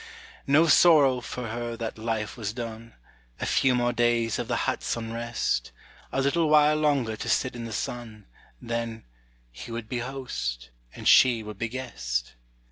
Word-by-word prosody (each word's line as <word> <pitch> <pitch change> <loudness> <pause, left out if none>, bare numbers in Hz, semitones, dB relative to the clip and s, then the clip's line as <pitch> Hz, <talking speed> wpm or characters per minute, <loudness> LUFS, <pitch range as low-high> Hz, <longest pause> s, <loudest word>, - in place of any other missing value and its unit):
No 145 +4 +5
sorrow 150 -6 +6
for 120 -1 -6
her 120 +1 -4
that 115 -1 -5
life 110 -1 -2
was 105 -3 -4
done: 115 -1 -7 0.4
A - - -2
few 130 -2 +3
more 120 0 +1
days 120 -2 +1
of - - -3
the - - 0
hut's - - -1
unrest, 115 +1 -2 0.4
A 135 - 0
little 155 +3 +2
while 150 0 +5
longer 140 -7 +1
to - - -5
sit 130 - +1
in 120 -1 -6
the 115 - -7
sun, 110 -1 -5 0.3
Then 115 -1 -4 0.5
He 65 - -9
would 115 -1 -5
be 125 +1 -3
host, 115 - -4 0.2
and - - -5
she 120 -3 +6
would 105 -2 -9
be 115 - -1
guest! 65 - -4
120 Hz, 165 wpm, -26 LUFS, 110-130 Hz, 0.5 s, sorrow